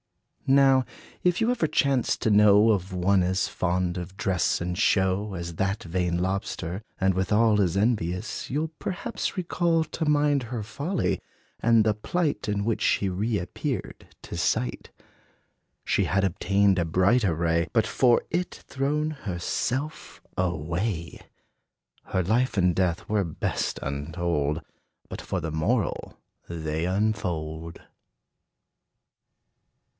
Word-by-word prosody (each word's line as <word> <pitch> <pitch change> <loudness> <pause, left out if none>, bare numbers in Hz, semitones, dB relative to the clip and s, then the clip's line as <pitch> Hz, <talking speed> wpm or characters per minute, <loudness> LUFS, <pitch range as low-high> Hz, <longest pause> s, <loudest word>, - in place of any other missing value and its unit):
Now, 135 -1 +5 0.4
if 180 -1 +2
you 225 +1 +2
ever 225 -10 +1
chance 135 -4 +1
to 115 - 0
know 105 +1 +6
Of 95 -3 -1
one 95 +1 +2
as 95 +1 +1
fond 90 0 -1
of 90 +2 -7
dress 95 -4 +1
and 90 +1 -3
show 95 +2 +1
As 85 -1 -5
that 95 +4 -1
vain 90 0 -1
lobster, 95 0 -2 0.2
and 95 0 +3
withal 105 +3 +3
As 90 -1 +1
envious, 105 -1 -1
you 145 +4 0
'll 160 - -4
perhaps 210 +3 -3
recall 170 -2 +1
To 160 +1 -4
mind 145 -2 +3
her 115 -4 -3
folly, 145 - -2 0.4
and 115 -1 +4
the 110 - +3
plight 150 +5 -2
In 100 -1 -1
which 115 -1 0
she 100 - +2
reappeared 95 -1 -3 0.2
to - - -7
sight. 65 +1 -1 1.0
She - - +2
had 95 0 +1
obtained 100 +1 +2
a - - +2
bright 95 +9 +3
array, 85 -2 +1
But 115 -3 +2
for 125 -2 +3
it, 180 +2 -1
thrown 150 +3 -1
herself 130 - -3 0.2
away! 85 +1 -2 0.8
Her 95 - -1
life 115 +5 +1
and 90 -2 +3
death 90 -1 0
were 105 -1 +1
best 80 -4 -2
untold, 75 +2 -2 0.5
But - - -7
for - - -3
the 80 - -4
moral 80 0 -1 0.3
they 80 -1 -2
unfold! 85 -5 -2
95 Hz, 130 wpm, -26 LUFS, 85-120 Hz, 1.0 s, know